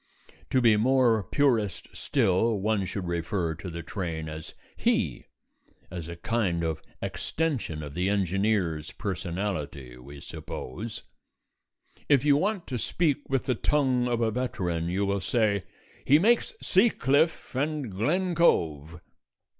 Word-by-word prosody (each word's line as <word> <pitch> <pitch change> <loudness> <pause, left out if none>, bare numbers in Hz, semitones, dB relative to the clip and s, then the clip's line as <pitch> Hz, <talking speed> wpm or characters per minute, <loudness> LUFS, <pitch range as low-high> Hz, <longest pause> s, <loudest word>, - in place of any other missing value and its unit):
To 130 - +3
be 115 -3 +5
more 120 -1 +4
purist 110 - +1
still, 115 -4 +1
one 105 -1 +1
should 95 0 -4
refer 85 0 -1
to 85 +3 -7
the 85 0 -6
train 85 -3 -4
as 80 0 -8 0.2
"he" - - 0 0.6
(as 85 -3 -6
a 85 - -6
kind 85 -2 0
of 80 -1 -2 0.2
extension 135 - -2
of 70 -1 -7
the 90 +4 0
engineer's 95 -4 0
personality, 90 - -4
we 70 +3 -11
suppose). 105 - -7 1.1
If 140 -2 +4
you 145 -1 +6
want 195 +3 0
to 125 -2 -4
speak 150 +2 0
with 135 -2 +1
the 130 - +2
tongue 130 -1 +1
of 120 -1 0
a 115 -1 +2
veteran, 90 -9 -2
you 95 +3 0
will 100 0 0
say, 105 0 +1 0.4
"He 145 - +6
makes 235 - +2
Sea 200 +5 +4
Cliff 150 - +1
and 145 -2 -1
Glen 175 - 0
Cove." 85 - +1
105 Hz, 140 wpm, -27 LUFS, 85-130 Hz, 1.1 s, you